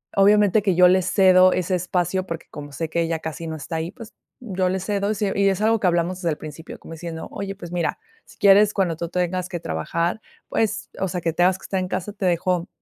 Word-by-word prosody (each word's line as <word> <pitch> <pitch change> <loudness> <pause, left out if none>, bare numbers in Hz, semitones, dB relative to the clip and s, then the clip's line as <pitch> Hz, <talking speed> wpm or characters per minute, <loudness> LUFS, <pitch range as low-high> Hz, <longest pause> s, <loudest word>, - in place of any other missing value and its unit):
obviamente 205 +1 +5
que 195 -3 +2
yo 180 +1 +7
le 185 +1 +4
cedo 185 -1 +5
ese 185 +1 0
espacio, 180 +1 -1
porque 165 -1 -6
como 145 -1 -8
sé 160 +3 -3
que 170 - 0
ella 165 -1 -1
casi 160 +1 -6
no 160 - -4
está 160 +3 -6
ahí, 160 +2 -3
pues, 230 -3 -12 0.3
yo 185 -5 -1
le 190 - -1
cedo 200 +2 -1
y - - -1
se 200 -1 -1
y 200 0 +4
es 195 +1 -1
algo 225 +1 +3
que 200 - -2
hablamos 175 +1 +1
desde 170 - 0
el 150 - -3
principio, 155 +1 -9
como - - -11
diciendo: 165 0 -7
"Oye, 195 0 -5
pues, 175 -3 -10
mira, 175 -2 -1 0.3
si - - -18
quieres, 205 +1 +6
cuando 180 -5 0
tú 170 - -3
tengas 180 +1 -2
que 175 - -4
trabajar, 170 - -2 0.3
pues, 220 -2 -1
o 190 - 0
sea, 180 0 -4
que 165 - 0
tengas 180 +2 +3
que - - -18
estar 190 - -1
en 185 - -2
casa, 185 +3 -3
te 200 -2 -4
dejo 180 0 +1
180 Hz, 250 wpm, -23 LUFS, 170-195 Hz, 0.3 s, yo